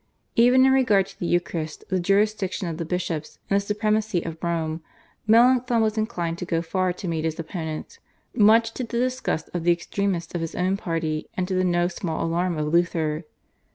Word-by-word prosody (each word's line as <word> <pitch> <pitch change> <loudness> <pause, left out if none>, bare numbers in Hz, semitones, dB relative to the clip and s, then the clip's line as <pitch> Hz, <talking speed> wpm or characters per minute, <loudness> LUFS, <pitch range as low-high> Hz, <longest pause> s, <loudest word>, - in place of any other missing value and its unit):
Even 250 +3 +6
in 265 - +5
regard 245 -8 +4
to - - -16
the 175 - -2
Eucharist, 170 -3 -2
the 185 -1 +1
jurisdiction 195 0 +1
of 165 -2 -4
the 165 - -3
bishops, 165 -3 -3
and 200 - +5
the - - -9
supremacy 210 -2 0
of 165 -1 -7
Rome, 165 -1 -1 0.5
Melanchthon 245 +1 +5
was 220 -1 +1
inclined 175 -7 -2
to 180 - -4
go 165 -1 -1
far 185 +2 0
to 180 +2 -6
meet 160 -2 -1
his 160 -1 -2
opponents, 160 - -5 0.3
much 225 0 +5
to 255 - -4
the 235 0 -4
disgust 250 -9 -1
of 175 -2 -2
the 175 - +4
extremists 175 0 -2
of 175 - -2
his 165 - -4
own 185 +2 +1
party 165 -5 -2
and 185 -1 -1
to 190 - -2
the 185 0 +2
no 175 -1 +2
small 170 -3 -3
alarm 170 +1 0
of 150 +1 -2
Luther. 165 -2 +1
180 Hz, 195 wpm, -24 LUFS, 165-215 Hz, 0.5 s, Even